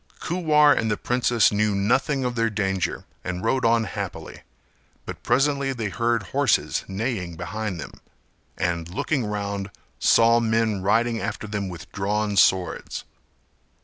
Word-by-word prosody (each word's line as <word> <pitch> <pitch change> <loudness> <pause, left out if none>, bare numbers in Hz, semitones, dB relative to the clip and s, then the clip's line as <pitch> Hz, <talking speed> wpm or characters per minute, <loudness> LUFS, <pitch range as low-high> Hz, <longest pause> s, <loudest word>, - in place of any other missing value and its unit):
Kuwar 155 -4 +4
and 110 - 0
the 105 - 0
princess 120 -2 +2
knew 105 0 +1
nothing 125 +7 +1
of 125 - -1
their 115 -1 +1
danger 95 -4 -2 0.2
and 90 0 -4
rode 130 +3 +1
on 115 0 +3
happily, 100 - -6 0.6
but - - -7
presently 140 0 +1
they 115 -5 -3
heard 115 +1 0
horses 135 -5 +1
neighing 95 -4 -3
behind 95 +2 -4
them - - -7 0.7
and 85 -2 -2
looking 135 - -1
round, 100 -1 -3 0.3
saw 115 +1 +5
men 110 -3 +1
riding 115 +4 +1
after - - -4
them 105 -2 -3
with 85 -2 -10
drawn 105 +1 -1
swords. 95 -2 +2
110 Hz, 140 wpm, -24 LUFS, 100-120 Hz, 0.7 s, saw